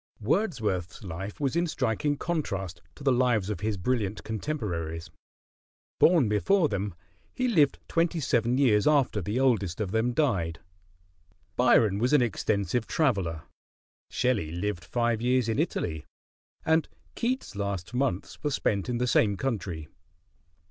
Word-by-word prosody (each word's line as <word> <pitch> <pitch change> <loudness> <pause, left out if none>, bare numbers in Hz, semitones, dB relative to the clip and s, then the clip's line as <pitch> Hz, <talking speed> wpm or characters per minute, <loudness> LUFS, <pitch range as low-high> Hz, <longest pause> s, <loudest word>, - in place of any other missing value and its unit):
Wordsworth's 110 - -1
life 95 +2 -6
was 140 0 0
in 170 +1 +2
striking 145 +1 0
contrast 95 - -3
to 145 - -12
the 135 - +3
lives 120 -5 +2
of 105 - -4
his 105 -1 -1
brilliant 105 0 -1
contemporaries. 95 - -4 0.9
Born 165 -8 +5
before 155 - +2
them, 100 -2 -3 0.4
he 255 - 0
lived 155 - +3
twenty 165 0 +1
seven 120 -3 +1
years 115 -6 +4
after 140 -8 +3
the 105 +8 -2
oldest 110 -10 +1
of 100 -4 -2
them 110 +3 +1
died. 95 - 0 1.0
Byron 110 -5 +4
was 125 +5 +1
an 145 - +6
extensive 110 -1 -1
traveler, 95 - 0 0.7
Shelley 115 -11 0
lived 85 0 -3
five 120 -2 0
years 125 -1 +2
in 115 +4 0
Italy, 80 - -2 0.6
and 160 0 +2 0.2
Keats' 250 - -2
last 100 -1 -3
months 125 -6 -2
were 150 - +1
spent 105 -5 -1
in 120 - 0
the 125 - 0
same 105 -4 +3
country. 95 - -3
115 Hz, 140 wpm, -28 LUFS, 100-140 Hz, 1.0 s, an